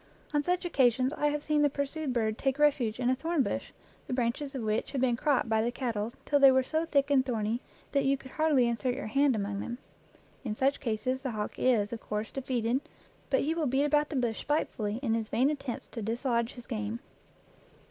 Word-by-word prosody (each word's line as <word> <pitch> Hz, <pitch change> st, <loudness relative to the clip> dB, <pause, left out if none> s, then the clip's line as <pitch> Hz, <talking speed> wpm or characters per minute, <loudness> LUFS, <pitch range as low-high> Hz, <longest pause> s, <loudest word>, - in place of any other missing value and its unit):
On 295 Hz, -, +3 dB
such 360 Hz, +4 st, 0 dB
occasions 260 Hz, -4 st, +3 dB
I 295 Hz, -, +1 dB
have 295 Hz, 0 st, -1 dB
seen 300 Hz, -1 st, +2 dB
the 290 Hz, -, +4 dB
pursued 280 Hz, +1 st, -3 dB
bird 220 Hz, -3 st, 0 dB
take 270 Hz, 0 st, 0 dB
refuge 270 Hz, -7 st, +2 dB
in 250 Hz, 0 st, +2 dB
a -, -, +2 dB
thorn 320 Hz, +1 st, 0 dB
bush 200 Hz, -, -3 dB, 0.4 s
the -, -, -3 dB
branches 255 Hz, +3 st, -1 dB
of 255 Hz, -, -3 dB
which 215 Hz, 0 st, -1 dB
had 270 Hz, -, -1 dB
been 250 Hz, -2 st, +3 dB
cropped 280 Hz, -1 st, +1 dB
by 220 Hz, -1 st, +2 dB
the 235 Hz, +2 st, 0 dB
cattle 230 Hz, -4 st, -2 dB
till 285 Hz, -, +3 dB
they 275 Hz, -1 st, +8 dB
were 260 Hz, 0 st, +3 dB
so 315 Hz, +5 st, -1 dB
thick 285 Hz, -3 st, +1 dB
and 270 Hz, -2 st, +5 dB
thorny 230 Hz, -2 st, -1 dB, 0.3 s
that 280 Hz, -1 st, +2 dB
you 275 Hz, +1 st, +2 dB
could 260 Hz, -1 st, -13 dB
hardly 300 Hz, -6 st, +3 dB
insert 245 Hz, +2 st, -1 dB
your 275 Hz, -, -5 dB
hand 275 Hz, +4 st, +3 dB
among 200 Hz, -1 st, -2 dB
them. 240 Hz, +3 st, -4 dB, 0.7 s
In 220 Hz, -5 st, -3 dB
such 270 Hz, +4 st, +1 dB
cases 255 Hz, +2 st, -1 dB
the 265 Hz, -, -2 dB
hawk 210 Hz, -1 st, -4 dB
is, 230 Hz, -4 st, +2 dB
of 225 Hz, -, -5 dB
course, 210 Hz, +1 st, -3 dB
defeated, 255 Hz, -1 st, -1 dB, 0.5 s
but 265 Hz, -, +3 dB
he 310 Hz, +3 st, 0 dB
will 325 Hz, -3 st, 0 dB
beat 265 Hz, +3 st, +2 dB
about 295 Hz, 0 st, +2 dB
the 305 Hz, -, -4 dB
bush 240 Hz, -4 st, 0 dB
spitefully 225 Hz, -8 st, -1 dB
in 225 Hz, -4 st, +1 dB
his 225 Hz, -1 st, -1 dB
vain 265 Hz, +5 st, +3 dB
attempts 275 Hz, -5 st, -5 dB
to 230 Hz, -, -6 dB
dislodge 235 Hz, +2 st, -1 dB
his 245 Hz, -2 st, -11 dB
game. 215 Hz, -1 st, -3 dB
255 Hz, 220 wpm, -30 LUFS, 230-285 Hz, 0.7 s, they